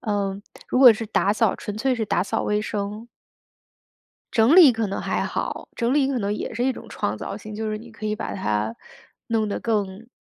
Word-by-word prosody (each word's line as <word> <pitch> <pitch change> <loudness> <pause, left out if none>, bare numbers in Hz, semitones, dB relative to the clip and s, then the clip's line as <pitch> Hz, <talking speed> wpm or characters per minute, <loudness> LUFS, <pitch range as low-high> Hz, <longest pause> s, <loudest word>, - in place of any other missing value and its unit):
嗯， 200 -2 -2 0.3
如 - - +1
果 255 -3 +10
是 225 +1 -5
打 200 -2 +2
扫 220 -1 +2
纯 210 - -6
粹 255 +4 +1
是 230 -2 -2
打 175 - +1
扫 200 - -2
卫 210 0 0
生 210 +2 -4 1.3
整 240 +7 +5
理 325 -8 +9
可 225 -2 -2
能 195 - -3
还 - - -1
好， - - -4
整 235 +3 +1
理 280 -2 +3
可 270 -2 0
能 205 -1 -1
也 - - -5
是 235 +2 -1
一 265 - +2
种 - - -11
创 100 - -2
造 195 - -6
性。 215 0 -9
就 215 0 -3
是 215 - -3
你 230 +1 -13
可 220 - -10
以 215 0 -1
把 - - -5
它 110 - -1 0.5
弄 225 -2 +1
得 205 - -3
更 210 -1 -2
215 Hz, 235 characters per minute, -23 LUFS, 200-235 Hz, 1.3 s, 果